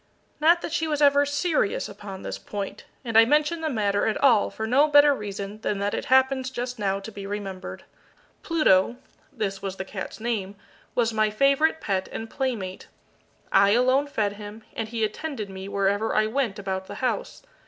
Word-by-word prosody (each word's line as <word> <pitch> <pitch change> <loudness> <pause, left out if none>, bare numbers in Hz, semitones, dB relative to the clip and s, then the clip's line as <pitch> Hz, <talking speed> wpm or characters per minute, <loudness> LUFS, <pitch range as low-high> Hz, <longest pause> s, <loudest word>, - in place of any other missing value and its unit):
Not 335 +3 +4
that - - -4
she 320 -1 0
was 300 -2 -1
ever 285 -1 +5
serious 285 - 0
upon 200 -1 -9
this - - -5
point, 200 -2 -6 0.2
and 230 -2 -4
I 225 - +9
mention 300 +6 +2
the 315 - -1
matter 205 -6 +1
at 220 - 0
all 240 -7 +4
for 220 - -5
no 265 +7 +4
better 290 -1 +6
reason 205 -2 -6
than 210 - -1
that 200 +1 -1
it - - -3
happens 260 0 +3
just 250 -1 -5
now 195 -1 0
to 200 +3 -9
be 200 -1 -8
remembered. 195 -2 -6 0.6
Pluto 305 - +3 0.4
this 195 -5 -3
was 195 -1 -4
the 190 - -5
cat's 190 +2 -7
name 215 -4 -3 0.4
was 230 -2 +1
my 215 0 +2
favourite 275 +8 +2
pet 190 -2 -2
and 225 0 -6
playmate. 225 -9 -3 0.6
I 200 +1 +5
alone 255 +4 +3
fed 205 -7 -1
him, 210 +1 -9
and 225 -1 -3
he 230 -1 -2
attended 215 -1 -3
me 190 0 -7
wherever 200 +2 0
I 215 - +4
went 225 -2 -1
about 190 -1 -4
the - - -7
house. - - -3
220 Hz, 185 wpm, -25 LUFS, 200-275 Hz, 0.6 s, I